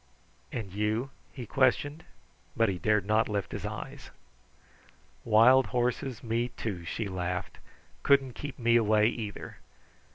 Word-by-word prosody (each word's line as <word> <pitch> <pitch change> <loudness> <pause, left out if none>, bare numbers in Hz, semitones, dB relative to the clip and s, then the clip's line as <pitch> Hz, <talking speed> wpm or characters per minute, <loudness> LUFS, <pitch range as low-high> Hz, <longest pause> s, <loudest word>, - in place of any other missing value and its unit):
"And 100 -5 -5
you?" 110 +6 -1 0.2
he 125 -3 -7
questioned, 140 +6 +1 0.5
but 115 -1 +3
he 90 -2 -3
dared 105 +1 +2
not 110 +2 +2
lift 100 -2 -2
his - - -4
eyes. - - -8 1.1
"Wild 115 +3 +6
horses 125 +2 -2
me, 115 +1 0
too," 100 -8 -5
she 110 +4 -3
laughed, 90 -1 -4 0.4
"couldn't 135 -2 +3
keep 145 +1 -7
me 120 -2 +3
away 110 -1 +3
either! 110 -4 -6
115 Hz, 130 wpm, -29 LUFS, 105-125 Hz, 1.1 s, Wild